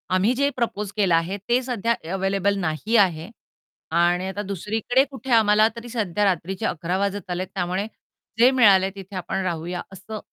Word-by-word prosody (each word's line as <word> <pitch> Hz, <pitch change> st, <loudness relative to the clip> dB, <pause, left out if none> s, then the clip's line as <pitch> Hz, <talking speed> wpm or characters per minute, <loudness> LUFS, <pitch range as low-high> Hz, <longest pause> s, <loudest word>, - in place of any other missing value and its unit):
आम्ही 200 Hz, +6 st, +3 dB
जे 280 Hz, +2 st, +2 dB
प्रपोज 210 Hz, -4 st, -2 dB
केलं 190 Hz, -5 st, +3 dB
आहे 170 Hz, +5 st, 0 dB
ते 245 Hz, +2 st, +3 dB
सध्या 235 Hz, -2 st, 0 dB, 0.2 s
अवेलेबल 195 Hz, +1 st, 0 dB
नाही 175 Hz, +7 st, -1 dB
आहे 175 Hz, -4 st, +2 dB, 0.7 s
आणि 175 Hz, +2 st, +2 dB
आता 190 Hz, +2 st, -4 dB
दुसरीकडे 215 Hz, +7 st, 0 dB
कुठे 265 Hz, -1 st, -7 dB
आम्हाला 215 Hz, -1 st, +5 dB
तरी 235 Hz, +1 st, -9 dB
सध्या 210 Hz, -4 st, -1 dB
रात्रीचे 185 Hz, 0 st, -1 dB
11:00 175 Hz, +3 st, -1 dB
वाजत 200 Hz, -1 st, -2 dB
आलेत 185 Hz, +1 st, -2 dB
त्यामुळे 185 Hz, +2 st, -1 dB, 0.5 s
जे 250 Hz, +3 st, +7 dB
मिळाल, 205 Hz, -7 st, +5 dB
तिथे 195 Hz, 0 st, -10 dB
आपण 190 Hz, +1 st, -3 dB
राहूया" 175 Hz, +1 st, -3 dB
असं 210 Hz, +3 st, -8 dB
195 Hz, 165 wpm, -23 LUFS, 180-220 Hz, 0.7 s, जे